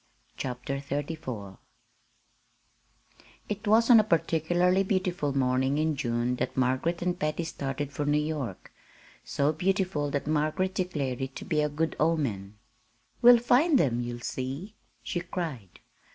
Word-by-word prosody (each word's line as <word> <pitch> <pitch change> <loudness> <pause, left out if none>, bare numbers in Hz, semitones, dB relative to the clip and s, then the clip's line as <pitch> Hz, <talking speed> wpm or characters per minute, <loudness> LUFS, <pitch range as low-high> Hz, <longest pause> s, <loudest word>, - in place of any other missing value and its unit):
CHAPTER 125 +1 -4
XXXIV 140 - -5 1.9
It 210 +1 -4
was 225 +2 +5
on 230 - +9
a - - +5
particularly 175 +1 +2
beautiful 180 -7 -1
morning 130 +1 +1
in 155 0 +1
June 120 -1 -1
that - - -3
Margaret 130 +7 0
and 180 0 -1
Patty 155 +2 -1
started 145 -3 -4
for 145 0 -2
New 145 0 +3
York 150 - -4 0.5
so 145 +2 0
beautiful 180 -3 0
that 140 0 -2
Margaret 155 +5 0
declared 150 -10 -2
it 130 0 -4
to - - -7
be 155 -1 +1
a 150 - +1
good 160 +2 -1
omen. 115 -11 0 0.6
"We'll 245 0 +9
find 265 +6 +4
them 120 - +1
you'll 120 0 -5
see!" 135 - -5 0.3
she 175 - -2
cried. 160 - -6
150 Hz, 135 wpm, -28 LUFS, 130-180 Hz, 1.9 s, on